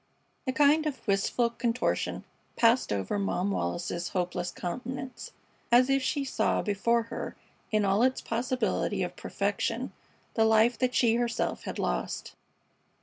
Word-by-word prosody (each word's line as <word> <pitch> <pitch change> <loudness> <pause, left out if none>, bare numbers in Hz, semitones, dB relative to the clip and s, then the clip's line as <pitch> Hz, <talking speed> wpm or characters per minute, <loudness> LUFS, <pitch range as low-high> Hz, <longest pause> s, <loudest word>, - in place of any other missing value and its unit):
A - - +2
kind 295 +3 +4
of 280 -5 -5
wistful 205 +4 +2
contortion 235 +1 -1 0.3
passed 235 +2 +3
over 100 - -1
Mom 195 0 0
Wallis's 170 - -2
hopeless 180 -1 -2
countenance, 255 +9 -5 0.4
as 250 +3 +6
if 275 0 +3
she 275 +2 -1
saw 265 - +1
before 230 +3 +1
her 230 +1 -6 0.4
in 215 -2 +2
all 195 +2 +3
its 260 +1 +3
possibility 250 +2 -1
of - - -4
perfection - - -2 0.4
the 225 - +3
life 220 +2 +5
that 255 -1 +1
she 230 -2 +4
herself 240 -1 -1
had - - -4
lost. - - -2
230 Hz, 140 wpm, -29 LUFS, 200-255 Hz, 0.4 s, as